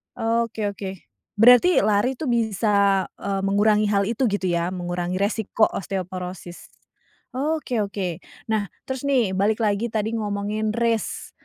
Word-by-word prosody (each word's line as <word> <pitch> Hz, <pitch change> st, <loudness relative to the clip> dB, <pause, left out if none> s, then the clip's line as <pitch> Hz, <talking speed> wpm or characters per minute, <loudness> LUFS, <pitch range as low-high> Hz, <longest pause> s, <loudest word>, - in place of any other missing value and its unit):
Oke, 225 Hz, -2 st, -1 dB
oke. 190 Hz, -2 st, -7 dB, 0.3 s
Berarti 245 Hz, -, +6 dB
lari 215 Hz, +5 st, +2 dB
tuh 265 Hz, -2 st, -2 dB
bisa, 200 Hz, -4 st, +2 dB
eee, 195 Hz, -1 st, -2 dB
mengurangi 210 Hz, +1 st, +3 dB
hal 200 Hz, -1 st, +2 dB
itu 235 Hz, +3 st, -1 dB
gitu 200 Hz, -2 st, -1 dB
ya? 170 Hz, 0 st, 0 dB
Mengurangi 175 Hz, 0 st, -3 dB
resiko 215 Hz, +1 st, +1 dB
osteoporosis? 185 Hz, -1 st, -6 dB, 0.7 s
Oke 285 Hz, -4 st, -1 dB
oke. 190 Hz, -4 st, -4 dB, 0.3 s
Nah 210 Hz, -2 st, 0 dB, 0.2 s
terus 265 Hz, 0 st, -4 dB
nih, 250 Hz, -9 st, +2 dB
balik 210 Hz, +3 st, +1 dB
lagi 215 Hz, +1 st, +1 dB
tadi 220 Hz, +1 st, -1 dB
ngomongin 210 Hz, 0 st, -2 dB
race. 230 Hz, -2 st, -1 dB
210 Hz, 130 wpm, -23 LUFS, 195-230 Hz, 0.7 s, Berarti